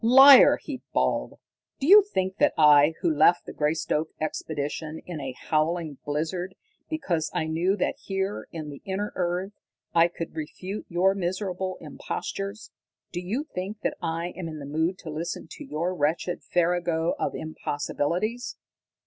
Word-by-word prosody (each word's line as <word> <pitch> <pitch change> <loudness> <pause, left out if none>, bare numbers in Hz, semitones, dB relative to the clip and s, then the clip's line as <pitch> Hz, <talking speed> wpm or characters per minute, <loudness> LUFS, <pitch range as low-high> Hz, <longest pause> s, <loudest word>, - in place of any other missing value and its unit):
"Liar!" 265 +3 +9
he 270 -5 -7
bawled. - - 0 0.4
"Do 270 - -2
you 405 +6 +10
think 190 - -2
that 295 +3 +3
I, 150 0 +6
who 165 -3 +2
left 175 +4 +4
the - - -8
Greystoke 155 +1 0
expedition 155 0 -3
in 170 -4 -6
a 135 -1 -4
howling 155 -2 -1
blizzard 165 +5 -3 0.3
because 175 - -1
I - - +1
knew 170 +5 +1
that - - -1
here, 195 +1 -3
in 155 -3 -6
the 140 - -10
inner 195 +2 -3
earth, 180 +2 -1 0.4
I 170 0 +6
could 170 -1 -7
refute 185 +6 -6
your 185 +3 +3
miserable 185 0 -3
impostures 195 +6 -5 0.4
do - - -3
you 215 +11 -2
think 200 +4 -5
that - - -1
I 165 +1 -2
am 180 -2 -5
in 155 -1 -6
the 145 - -7
mood 160 +6 0
to 160 - -6
listen 165 +3 -4
to - - -8
your 170 +4 -2
wretched 170 +2 -1
farrago 175 -1 +1
of - - -1
impossibilities?" 170 - -2
175 Hz, 155 wpm, -26 LUFS, 155-190 Hz, 0.4 s, you